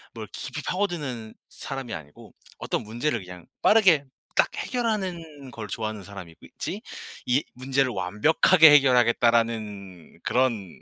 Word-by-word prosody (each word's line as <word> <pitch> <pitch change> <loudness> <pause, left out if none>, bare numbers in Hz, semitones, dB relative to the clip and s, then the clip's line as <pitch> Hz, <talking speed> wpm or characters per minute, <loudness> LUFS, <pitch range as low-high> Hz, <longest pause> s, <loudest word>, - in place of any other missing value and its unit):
뭘 - - -6
깊이 - - -6
파고드는 145 - -3
사람이 135 -4 -7
아니고 75 -2 -11 0.2
어떤 - - -2
문제를 120 +3 -2
그냥 90 -1 -11 0.2
빠르게 185 -10 +5 0.3
딱 - - +4
해결하는 180 - -3
걸 110 -3 -7
좋아하는 110 -1 -4
사람이 95 -4 -10
있지 - - -6 0.5
'이 130 +4 +2
문제를 130 +1 0
완벽하게 105 - +5
해결하겠다.'라는 115 - +2
그런 115 -7 -1
120 Hz, 305 characters per minute, -25 LUFS, 105-150 Hz, 0.5 s, 빠르게